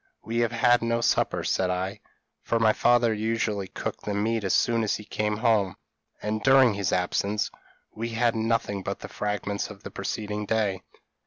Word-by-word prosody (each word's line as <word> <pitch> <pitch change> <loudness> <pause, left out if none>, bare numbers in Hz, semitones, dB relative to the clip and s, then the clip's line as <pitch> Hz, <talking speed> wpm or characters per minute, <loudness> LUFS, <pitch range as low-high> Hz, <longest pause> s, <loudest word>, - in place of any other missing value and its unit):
'We 115 +1 -3
have 120 -1 +2
had 120 +1 +4
no 115 0 0
supper,' 115 - +1
said 95 - +1
I, 95 +3 -2 0.4
for 115 - 0
my 110 -1 +4
father 120 -1 +3
usually 110 -2 -1
cooked - - -5
the 105 - -2
meat 110 +2 0
as 95 - 0
soon 115 -1 +2
as 110 - +1
he 105 - -8
came 105 0 -1
home; 110 -5 +2 0.5
and 110 +1 -1
during 135 -1 +6
his 100 -2 -1
absence 100 +3 0 0.4
we 115 +2 -4
had 115 0 +1
nothing 110 -3 0
but - - -5
the - - -6
fragments 105 -1 -3
of - - -12
the - - -7
preceding 105 -1 -4
day. 105 -4 0
110 Hz, 180 wpm, -26 LUFS, 100-115 Hz, 0.5 s, during